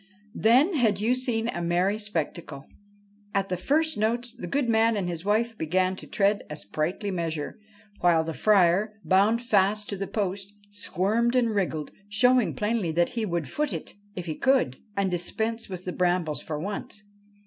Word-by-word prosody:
Then 260 - +4
had 225 - +2
you 225 +4 +2
seen 245 -3 -1
a 175 - -3
merry 180 +5 +1
spectacle! 165 -7 -4 0.7
At 195 0 +1
the 180 - 0
first 305 - +1
notes 235 +2 0
the 245 - -7
good 280 -3 0
man 225 -1 +3
and 190 -3 -1
his 170 -1 -4
wife 225 +3 +1
began 185 +1 0
to - - -10
tread 200 0 +2
a 150 - -6
sprightly 170 +7 -3
measure, 165 +1 -3 0.4
while 170 -2 +4
the 165 0 -4
Friar, 200 +2 +3
bound 210 +5 +3
fast 210 -2 +2
to 200 - -3
the 195 +1 -3
post, 200 -1 -3 0.2
squirmed 210 +4 0
and 235 -3 +2
wriggled, 165 -7 -1 0.2
showing 250 +2 +3
plainly 210 -5 0
that 175 +1 +2
he 225 -2 -2
would 170 -5 -2
foot 300 - -2
it - - -6 0.2
if 180 - -5
he 160 - -3
could, 255 - +2 0.2
and 195 -2 +1
dispense 220 +6 -2
with 185 -1 -7
the 180 - -3
brambles 175 -4 0
for 155 - -4
once. 205 +3 -6
200 Hz, 175 wpm, -26 LUFS, 175-225 Hz, 0.7 s, Then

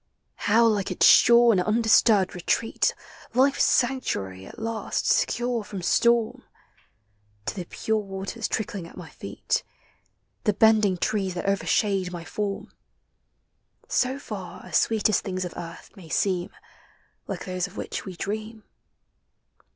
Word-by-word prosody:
How 230 +3 +5
like 210 -4 +1
its - - +2
sure 235 0 +7
and 190 -4 +3
undisturbed 215 -2 +3
retreat 180 +6 0 0.2
— - - -20
Life's 270 +2 +4
sanctuary 95 - 0
at - - -13
last, 225 0 -3
secure 240 -2 +1
from 195 -3 -7
storm 235 +3 +2 0.5
— 105 0 -41
To - - -2
the 180 -3 -5
pure 220 +5 -1
waters 195 +3 -5
trickling 200 -5 -3
at - - -15
my - - -10
feet, - - -3 0.8
The 210 - +2
bending 215 -2 +4
trees 190 0 -1
that 175 - -4
overshade 195 -1 +1
my 170 -1 -7
form! 200 0 -4 1.2
So 255 +1 0
far 195 -9 -8
as - - +1
sweetest 215 -2 +2
things 185 -1 -3
of 175 - -6
earth 170 -1 -9
may 180 -6 -13
seem 180 +1 0 0.8
Like - - -5
those 185 0 -2
of 195 - -15
which - - -5
we 190 -3 -8
dream. 215 +3 -5
200 Hz, 140 wpm, -25 LUFS, 180-225 Hz, 1.2 s, sure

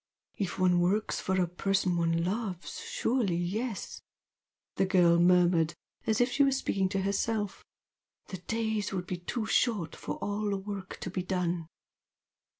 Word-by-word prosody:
"If 195 -4 -3
one 180 -1 +4
works 195 +5 +1
for 190 0 0
a 180 - +3
person 185 +1 0
one 165 0 +1
loves, 190 -1 -3
surely 225 -8 0
yes!" 200 +6 -3 0.8
the 190 - +2
girl 175 -3 +5
murmured 175 -2 +4 0.3
as 220 - +2
if 245 +1 +3
she 285 - +4
were 275 - +4
speaking 195 -8 0
to 195 0 -1
herself, 205 +1 -1 0.7
"The 185 - -5
days 220 +1 -1
would 180 -2 -2
be 180 - -3
too 220 +6 -3
short 215 -6 +1
for - - -5
all 205 +1 -2
the 200 - 0
work 195 -1 -6
to 180 - -4
be 185 - -2
done!" 180 -2 -1
190 Hz, 155 wpm, -30 LUFS, 175-210 Hz, 0.8 s, girl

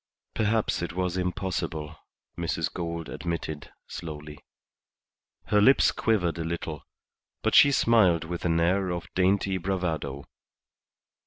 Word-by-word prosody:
"Perhaps 110 -2 +1
it 85 - -4
was 90 0 -1
impossible," 90 -4 -3 0.4
Mrs. 80 -2 -2
Gould 85 -2 -4
admitted, 80 -3 -5 0.2
slowly. 75 -2 -8 1.1
Her 105 -1 +3
lips 135 +6 +5
quivered 90 -7 0
a - - -1
little, 80 -2 -4 0.6
but - - +1
she 140 - +8
smiled 105 - +4
with 85 +1 -5
an 85 -1 +2
air 90 +3 +2
of 85 -1 -5
dainty 95 +1 +2
bravado. 80 -7 -3
85 Hz, 115 wpm, -27 LUFS, 80-95 Hz, 1.1 s, she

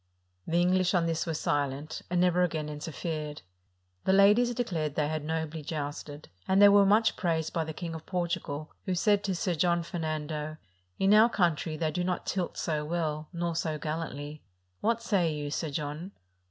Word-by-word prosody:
The 170 +1 +2
English 185 +1 +3
on 170 -2 +3
this 165 0 -1
were 165 - -1
silent, 145 0 -1
and 180 0 +1
never 180 0 +3
again 160 -4 0
interfered. 150 - -5 0.6
The 190 - +4
ladies 210 +5 +6
declared 165 - -2
they 150 -1 +1
had 155 -1 -2
nobly 160 0 -3
jousted; 145 -1 -5 0.2
and 190 +1 +3
they 205 0 +9
were 200 -1 +6
much 220 +3 +4
praised 165 -4 -1
by 165 -1 0
the 160 - -4
Kingof 165 -2 -6
Portugal, 170 -4 -3
who 185 - 0
said 205 +2 +3
to 190 -2 0
Sir 180 +1 0
John 170 +1 +2
Fernando, 155 -2 -3 0.4
"In 195 +1 +4
our 220 +2 +7
country 165 -6 0
they 155 0 0
do 180 - -1
not 180 -1 -2
tilt 185 -3 -2
so 155 -2 -1
well, 155 -1 -2
nor 170 -1 -2
so 160 -2 -1
gallantly: 150 -1 -5 0.4
what 230 +1 0
say 185 -8 +2
you. 145 -1 -4
Sir 160 +1 -2
John?" 150 +6 -4
165 Hz, 180 wpm, -29 LUFS, 155-180 Hz, 0.6 s, they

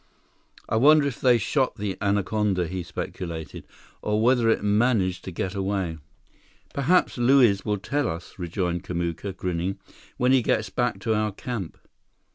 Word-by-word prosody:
"I 110 - 0
wonder 150 +4 +6
if 140 -4 -4
they 125 -2 +5
shot 130 +4 0
the 100 -3 -3
anaconda," 100 -2 +1
he 95 +1 -4
speculated, 85 -2 -6 0.3
"or 105 0 0
whether 120 0 +3
it 110 - +2
managed 105 -3 +2
to 95 - -5
get 90 +2 -3
away." 95 -4 -2 0.7
"Perhaps 140 0 +2
Luiz 120 -6 +4
will 105 -1 0
tell 140 +8 -1
us," 85 +3 -7
rejoined 90 0 -2
Kamuka, 85 +2 -3
grinning, 90 +1 -2 0.4
"when 125 +1 +2
he 130 -1 +5
gets 110 -1 0
back 120 -4 0
to 110 +1 0
our 105 0 0
camp." 100 -4 -6
105 Hz, 150 wpm, -25 LUFS, 90-120 Hz, 0.7 s, wonder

